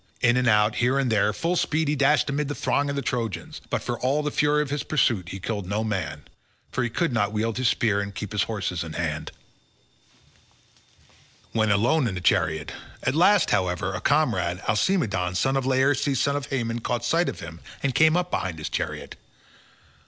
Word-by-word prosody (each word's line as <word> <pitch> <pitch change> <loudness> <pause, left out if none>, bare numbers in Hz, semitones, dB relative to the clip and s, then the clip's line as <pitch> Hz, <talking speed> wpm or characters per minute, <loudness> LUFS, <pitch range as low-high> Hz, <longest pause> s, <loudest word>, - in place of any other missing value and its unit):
In 120 0 +4
and 125 0 +2
out, 105 -1 +4
and - - -12
here 125 +3 +2
and 135 -3 +1
there, 105 -1 +3
full 170 - -1
speed 160 -2 0
he 150 - +1
dashed 145 +2 +3
amid 140 +1 -1
the 145 - -3
throng 145 0 0
of 140 - -2
the 140 - -2
Trojans, 115 -3 -3
but - - -1
for - - -3
all 140 +4 +1
the 150 - -1
fury 150 +1 +2
of 140 - -8
his 145 - -1
pursuit 120 - +1
he 95 - -6
killed 100 -1 -4
no 105 +3 -1
man, 90 -9 -3 0.5
for 130 - -1
he 120 - -1
could 160 +4 -1
not 105 -3 +1
wield 110 +2 -1
his 130 - +2
spear 105 -4 +2
and 100 0 -6
keep 105 - -5
his 105 - 0
horses 95 -6 -2
in 80 -1 -7
hand 80 -3 -3 2.2
when 110 -1 +1
alone 120 +8 +3
in 95 - -3
the - - -3
chariot; 80 -2 +1 0.3
at 130 - +1
last, 190 +6 +4
however, 95 +1 0
a 90 - -4
comrade, 90 - +1
Alcimedon, 105 - +1
son 135 +7 +1
of 135 -1 0
Laerces 135 +1 +2
son 140 +2 +1
of 145 -1 -3
Haemon 120 -4 -2
caught 120 0 -2
sight 170 +7 +2
of - - -7
him 85 0 -8 0.2
and 140 -2 +1
came 160 +4 +4
up 180 0 -1
behind 90 -3 -2
his 80 - -5
chariot. - - -4
120 Hz, 205 wpm, -25 LUFS, 100-140 Hz, 2.2 s, In